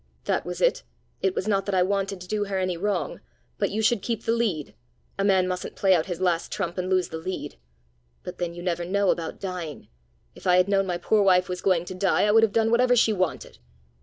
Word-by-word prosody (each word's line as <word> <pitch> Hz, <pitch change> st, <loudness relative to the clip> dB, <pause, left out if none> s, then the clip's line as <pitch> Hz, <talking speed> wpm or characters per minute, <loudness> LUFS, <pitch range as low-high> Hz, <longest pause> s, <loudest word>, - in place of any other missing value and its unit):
That -, -, -1 dB
was -, -, -5 dB
it! -, -, +3 dB, 0.4 s
It 190 Hz, -1 st, 0 dB
was 195 Hz, -, -2 dB
not 195 Hz, -2 st, +1 dB
that 200 Hz, -, 0 dB
I 180 Hz, -, +4 dB
wanted 195 Hz, 0 st, -1 dB
to 180 Hz, -, -9 dB
do 210 Hz, +1 st, -1 dB
her 195 Hz, -1 st, -3 dB
any 185 Hz, -1 st, -1 dB
wrong. 205 Hz, +4 st, -2 dB, 0.4 s
But -, -, +1 dB
you 220 Hz, +1 st, -2 dB
should 225 Hz, -2 st, +2 dB
keep 225 Hz, +1 st, -3 dB
the 225 Hz, -, 0 dB
lead. 215 Hz, -11 st, -1 dB, 0.5 s
A -, -, +2 dB
man 190 Hz, -2 st, +3 dB
mustn't 180 Hz, 0 st, -4 dB
play 195 Hz, -1 st, +3 dB
out 165 Hz, -3 st, +1 dB
his 175 Hz, -2 st, -4 dB
last 175 Hz, -3 st, 0 dB
trump 175 Hz, -2 st, -3 dB
and 185 Hz, 0 st, -2 dB
lose 185 Hz, -1 st, +1 dB
the 160 Hz, -, -5 dB
lead. 185 Hz, -, -6 dB, 0.6 s
But -, -, -8 dB
then 170 Hz, -1 st, -3 dB
you 175 Hz, -, -8 dB
never 175 Hz, -1 st, -1 dB
know 200 Hz, +2 st, +2 dB
about 165 Hz, -1 st, -4 dB
dying! 180 Hz, -6 st, -6 dB, 0.4 s
If -, -, -9 dB
I 180 Hz, 0 st, +5 dB
had 180 Hz, +1 st, +4 dB
known 195 Hz, -1 st, +2 dB
my 175 Hz, -1 st, -1 dB
poor 210 Hz, +5 st, +2 dB
wife 185 Hz, -2 st, +4 dB
was 180 Hz, 0 st, -4 dB
going 180 Hz, -3 st, +2 dB
to 185 Hz, -, -6 dB
die, 185 Hz, +1 st, +1 dB
I 210 Hz, -, +3 dB
would 225 Hz, +1 st, +6 dB
have 225 Hz, -2 st, +3 dB
done 225 Hz, +1 st, +2 dB
whatever 245 Hz, +1 st, +4 dB
she 225 Hz, -2 st, +4 dB
wanted. 185 Hz, -4 st, -3 dB
190 Hz, 245 wpm, -25 LUFS, 180-205 Hz, 0.6 s, would